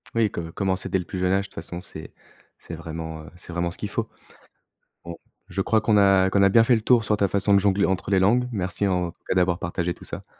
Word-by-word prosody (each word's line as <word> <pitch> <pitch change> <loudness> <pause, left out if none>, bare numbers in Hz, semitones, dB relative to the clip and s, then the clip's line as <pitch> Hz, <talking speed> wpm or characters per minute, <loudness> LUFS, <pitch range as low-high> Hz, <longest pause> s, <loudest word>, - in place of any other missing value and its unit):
Oui, 110 -3 +2
co - - -4
commencer 95 +1 -2
dès 95 - +1
le 90 - -4
plus 95 - -6
jeune 90 0 +1
âge, 100 0 +1
de - - -13
toute - - -22
façon, 85 +2 -7
c'est 80 -4 -10 0.4
c'est 85 - -11
vraiment, 80 -1 -6
heu, - - -12
c'est 90 0 -12
vraiment 85 0 -1
ce - - -9
qu'il 105 - -5
faut. 115 +1 -3 1.0
Bon, 85 0 -7 0.3
je 95 - -3
crois 110 +3 +2
qu'on 105 -1 +3
a 95 -1 +4
qu'on 100 +1 +3
a 100 - +6
bien 115 +3 +5
fait 120 +1 +4
le 110 - +1
tour 115 +1 +3
sur 105 0 +1
ta 100 - +2
façon 100 +2 +1
de 100 - +5
jongler 100 0 +2
entre 95 +1 -1
les 95 - +4
langues, 120 +7 +2
merci, 95 -2 -2
en 90 -2 0
tout - - -26
cas, - - +1
d'avoir 90 -1 +2
partagé 85 +1 -2
tout - - -14
ça. - - -7
95 Hz, 270 wpm, -24 LUFS, 85-105 Hz, 1.0 s, a